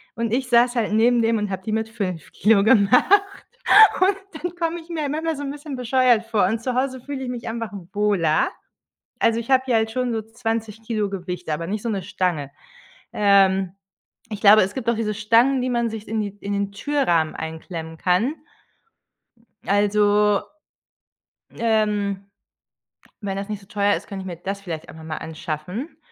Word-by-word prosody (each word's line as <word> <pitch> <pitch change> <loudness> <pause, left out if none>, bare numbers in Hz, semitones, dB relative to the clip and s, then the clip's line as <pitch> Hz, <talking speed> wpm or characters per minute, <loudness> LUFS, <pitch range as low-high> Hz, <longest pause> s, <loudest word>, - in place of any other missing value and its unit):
und 230 -1 -2
ich 255 +2 0
saß 240 +1 +4
halt 220 -3 0
neben 235 +2 +4
dem 225 0 +2
und 210 -1 -2
habe 190 -1 -5
die 215 - -4
mit 220 0 -1
5 185 -7 -5
Kilo 210 -2 +3
gemacht 220 +2 +5 1.0
und 385 +1 +4 0.3
dann 355 0 -3
komme 340 0 -2
ich 325 - -19
mir 310 -4 -2
manchmal 320 +2 -2
so 285 - -6
'n 275 - -3
bisschen 290 -1 -7
bescheuert 250 -2 +2
vor 220 -4 +2
und 225 +3 -2
zu 250 0 -2
Hause 260 0 -1
fühle 275 0 -6
ich 250 - -4
mich 245 -2 -6
einfach 230 -2 -4 0.2
wohler. 200 -7 +2 0.7
Also, 230 0 +3
ich 230 - -8
habe 260 -1 +4
ja 235 - +3
halt 220 0 +1
schon 250 -2 -1
so 220 - -2
20 225 -1 -4
Kilo 215 -3 -2
Gewicht, 180 -3 -5
aber 165 +2 -2
nicht 210 +1 -3
so 235 - -3
'ne 195 -3 -2
Stange. 175 -6 -2 0.6
Ähm, 195 -2 +3 0.6
ich 205 -1 -5
glaube, 210 +1 +8
es 195 +2 -2
gibt 235 -2 -1
auch - - +1
diese 215 -2 -2
Stangen, 230 +5 +3
die 255 - -1
man 235 -1 0
sich 220 -2 -8
in 220 0 -1
die 205 -1 -2
in 200 - -4
den 200 0 -2
Türrahmen 200 - 0
einklemmen 160 0 -7
kann. 195 - +1 1.3
Also, 205 0 +3 1.2
ähm, 210 -3 0 1.0
wenn 195 -1 -3
das 200 +2 -5
nicht 210 -1 -5
so 195 - -19
teuer 205 -1 +1
ist, - - -7
könnte 195 -1 -6
ich - - -8
mir 175 - -5
das 195 +2 -5
vielleicht 165 -4 -7
einfach 160 0 -11
mal 155 -1 -5
anschaffen, 160 - -6
215 Hz, 185 wpm, -22 LUFS, 195-240 Hz, 1.3 s, glaube